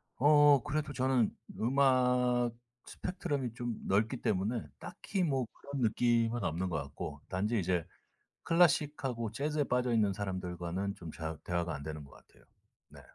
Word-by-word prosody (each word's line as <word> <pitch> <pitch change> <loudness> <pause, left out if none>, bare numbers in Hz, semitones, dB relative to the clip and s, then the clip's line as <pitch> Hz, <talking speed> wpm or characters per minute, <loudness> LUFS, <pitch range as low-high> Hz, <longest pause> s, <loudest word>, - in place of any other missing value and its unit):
어 145 0 +6
그래도 150 -1 -2
저는 130 -3 +1 0.2
음악 125 -1 +3 0.3
스펙트럼이 145 - -3
좀 120 -1 -3
넓기 110 +6 +2
때문에 105 +1 -1
딱히 195 -3 -3
뭐 135 -6 +1
그런 140 -1 -6
느낌은 115 0 +2
없는 90 +1 -1
것 80 - -1
같고 70 +1 -7
단지 105 +5 0
이제 90 -2 0 0.6
클래식하고 140 -9 +2
재즈에 145 +5 0
빠져있는 120 -5 +2
사람들과는 95 0 -3
좀 85 -2 -9
잘 80 -1 -5
대화가 85 -1 -1
안 70 - -6
되는 75 0 -6
것 70 - -17
같아요. - - -20 0.4
네. - - -14
120 Hz, 300 characters per minute, -32 LUFS, 95-135 Hz, 0.6 s, 어